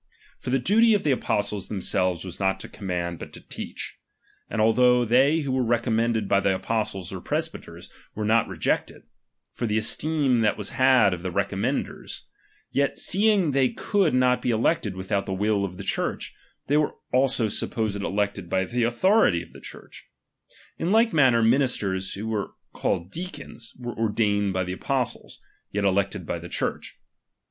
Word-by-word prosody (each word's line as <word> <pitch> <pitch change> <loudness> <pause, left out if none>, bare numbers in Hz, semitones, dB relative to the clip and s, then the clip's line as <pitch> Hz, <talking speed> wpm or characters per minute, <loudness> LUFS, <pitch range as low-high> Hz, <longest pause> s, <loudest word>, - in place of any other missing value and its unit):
For - - -6
the 130 - +3
doty 220 - +4
of 200 - -1
ihe 145 - +3
apostles 105 -5 -1
themselves 95 -3 -1
was 90 - -6
not 95 -1 +1
to - - -7
command, 85 -3 -4
but - - -8
to - - -9
teach. - - -7 0.5
And 115 - -3
althonsh 125 +2 +4
they 140 +7 +4
who 140 -3 -3
were 130 0 +1
recommeuded 115 -2 +1
"by 100 - +3
the 100 -1 +1
apostles 105 -3 -3
or - - -6
presbyters, - - -4 0.3
were 105 - -2
not 110 +1 +3
rejected, - - -2 0.5
for 120 - -2
the 105 0 0
esteem 140 +3 +1
that 110 - +2
was 105 - -4
had 130 -7 +4
of 90 - -5
the 95 - -3
recommendere; 100 +7 -2 0.5
yet 140 0 0
seeing 200 -4 +2
they 135 -2 +3
could 195 - +1
not 125 0 +3
be - - -1
elected 110 - +1
without 100 +1 -2
the 95 - -2
srs// 105 +1 +1
of 90 -2 -7
the - - -6
Church, - - -2 0.3
they 145 - +2
were 150 -1 +1 0.2
also 130 -3 +3
supposed 110 0 -2
elected 100 -3 -2
by 95 0 +1
the 120 +6 -2
autkorilg 120 - +3
of 80 - -17
the - - -13
Church, - - -12 0.7
In 170 - 0
like 225 0 +4
manner 130 -7 +4
xninisters, 110 -6 +1
who 110 +3 -4
are 105 -2 -3 0.2
called 85 +2 -2
deacons, 175 -9 -8
were 120 -1 -5
ordatKed 105 -2 +1
by 95 0 0
the 90 0 -4
apostles; - - -3 0.3
yet 100 0 -1
elected 100 +1 0
by - - -3
the - - -9
Church. - - -3
110 Hz, 170 wpm, -25 LUFS, 100-130 Hz, 0.7 s, doty